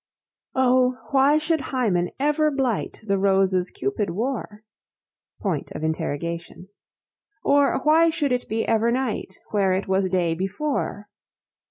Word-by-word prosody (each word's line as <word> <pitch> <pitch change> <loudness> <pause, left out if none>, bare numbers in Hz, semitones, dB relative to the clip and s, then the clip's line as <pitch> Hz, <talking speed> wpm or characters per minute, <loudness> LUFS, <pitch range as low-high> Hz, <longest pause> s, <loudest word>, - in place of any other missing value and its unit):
why 260 +2 +3
should 310 0 0
Hymen 215 -10 0
ever 300 +2 +2
blight 265 -6 -2
The 195 -2 +1
roses 190 -2 +2
Cupid 135 +10 -2
wore? 215 +1 -4 0.8
Or 185 -8 0 2.2
why 320 +2 +5
should 295 -4 -1
it 250 0 -1
be 225 +1 -1
ever 225 +1 +2
night 240 -6 -2
Where 195 -3 +2
it 190 +1 -2
was 190 0 +1
day 175 -3 +1
before? 205 - -3
225 Hz, 110 wpm, -24 LUFS, 190-270 Hz, 2.2 s, why